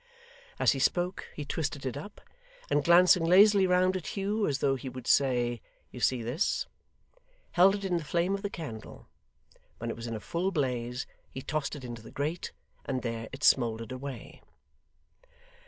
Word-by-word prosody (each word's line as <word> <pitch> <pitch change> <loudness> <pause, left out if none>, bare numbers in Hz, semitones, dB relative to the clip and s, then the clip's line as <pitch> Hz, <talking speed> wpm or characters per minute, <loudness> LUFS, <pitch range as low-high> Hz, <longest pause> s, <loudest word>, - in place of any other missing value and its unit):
As - - +4
he 135 - -2
spoke, 175 +7 0
he 150 - -5
twisted 145 -2 -3
it 130 - -2
up, 155 +9 -9 0.5
and 145 - +3
glancing 175 +1 +6
lazily 195 +3 +6
round 185 +1 +3
at 185 - -4
Hugh 205 +2 0
as 140 - 0
though 140 0 +2
he 130 0 -5
would 130 -1 -9
say 120 -4 +2 0.3
'You - - -9
see 125 -3 +1
this?' 130 - 0 0.9
held 190 +3 +5
it 200 -1 -5
in 180 -2 +1
the 165 - -4
flame 170 +5 0
of 200 - -2
the 205 - -3
candle. 140 - -8 0.7
When 115 0 -4
it - - -5
was 115 +1 -7
in 115 - -4
a - - -4
full 175 - -2
blaze, 125 -5 -2 0.2
he 130 - -8
tossed 155 -1 -2
it 140 - -9
into 120 -2 -7
the 110 - -12
grate, 155 +5 -3 0.3
and 130 -2 -3
there 115 -2 -4
it 135 - -9
smouldered 115 -3 +3
away. 130 -2 -7
140 Hz, 180 wpm, -29 LUFS, 125-180 Hz, 0.9 s, glancing